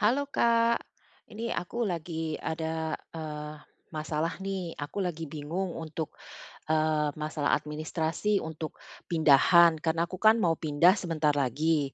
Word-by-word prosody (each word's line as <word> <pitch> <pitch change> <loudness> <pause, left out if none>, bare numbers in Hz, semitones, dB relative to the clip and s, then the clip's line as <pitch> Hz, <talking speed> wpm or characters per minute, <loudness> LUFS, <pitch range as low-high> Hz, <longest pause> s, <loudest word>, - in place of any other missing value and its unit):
Halo, 230 +6 +3
Kak, 230 0 +4 0.6
ini 220 +2 -7 0.2
aku 175 +6 -9
lagi 165 -1 -4 0.3
ada, 160 0 -2 0.5
eee, 150 -1 -5 0.4
masalah, 155 +1 -1
nih. 195 -1 -2 0.2
Aku 145 - -7
lagi 165 -2 -4
bingung 165 +5 -3
untuk, 160 0 -4 0.6
eee, 155 -1 +2 0.2
masalah 150 -1 -1
administrasi 155 +5 -2 0.2
untuk 160 0 -5 0.4
pindahan, 165 +2 +6
karena 165 0 +1
aku 185 - -7
kan 220 +1 +8
mau 165 -1 +3
pindah 155 +5 +5
sebentar 155 -4 +1
lagi, 150 +5 +1
160 Hz, 125 wpm, -29 LUFS, 155-175 Hz, 0.6 s, kan